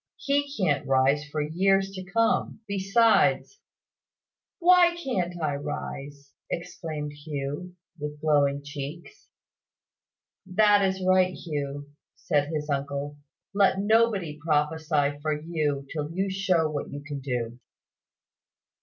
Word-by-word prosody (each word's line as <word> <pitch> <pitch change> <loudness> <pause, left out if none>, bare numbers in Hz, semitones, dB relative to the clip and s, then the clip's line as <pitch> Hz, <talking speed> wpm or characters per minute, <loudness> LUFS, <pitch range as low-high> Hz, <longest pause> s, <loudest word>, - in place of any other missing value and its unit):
"He 285 0 0
can't 150 -8 +1
rise 135 +2 +3
for 150 0 -3
years 195 +5 +2
to 190 -1 -7
come. 225 +2 0
Besides 205 - +3 0.5
" - - -67 0.3
"Why 355 -1 +5
can't 185 - -2
I 155 -3 0
rise?" 140 0 -6 0.2
exclaimed 155 -3 -5
Hugh, 145 +4 -5 0.2
with 150 0 -5
glowing 145 -2 +2
cheeks. 145 +3 -8 1.2
"That 205 +1 +4
is 190 -1 0
right, 185 0 +4
Hugh," 145 -2 -5 0.2
said 145 -1 0
his 150 -2 -3
uncle. 140 0 -3 0.4
"Let 195 -1 +4
nobody 205 -7 +2
prophesy 150 -2 +1
for 155 0 -1
you 150 -3 -2
till 150 -1 -3
you 190 +3 -1
show 185 -4 +2
what 150 -2 -4
you 145 0 -7
can 145 -2 -5
do." 125 -3 -3
155 Hz, 120 wpm, -26 LUFS, 145-195 Hz, 1.2 s, Why